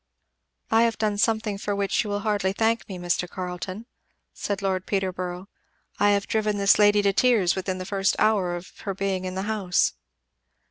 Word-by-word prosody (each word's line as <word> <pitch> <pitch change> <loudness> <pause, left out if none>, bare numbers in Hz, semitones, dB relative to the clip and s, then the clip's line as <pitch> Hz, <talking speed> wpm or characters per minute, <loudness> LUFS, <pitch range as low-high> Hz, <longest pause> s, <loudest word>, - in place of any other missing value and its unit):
"I 225 0 +5
have 230 -1 +2
done 210 -2 -1
something 220 -2 +1
for 205 0 -2
which 200 +2 0
you 210 - -6
will 205 0 -2
hardly 205 -3 0
thank 225 +2 0
me, 190 - -5
Mr. 175 0 -1
Carleton," 185 +4 -6 0.5
said 200 -1 -4
Lord 190 -1 -1
Peterborough. 185 -1 -3 0.5
"I 205 - +4
have 200 -1 +2
driven 215 -1 0
this 200 +1 +4
lady 205 0 +5
to 200 -1 +3
tears 215 -6 +3
within 185 0 -3
the 185 - -6
first 195 0 +1
hour 200 -5 +2
of 175 +1 -10
her 195 -2 -4
being 195 -1 -2
in 185 0 -4
the 190 - -2
house." 205 -4 +1
200 Hz, 185 wpm, -25 LUFS, 185-210 Hz, 0.5 s, I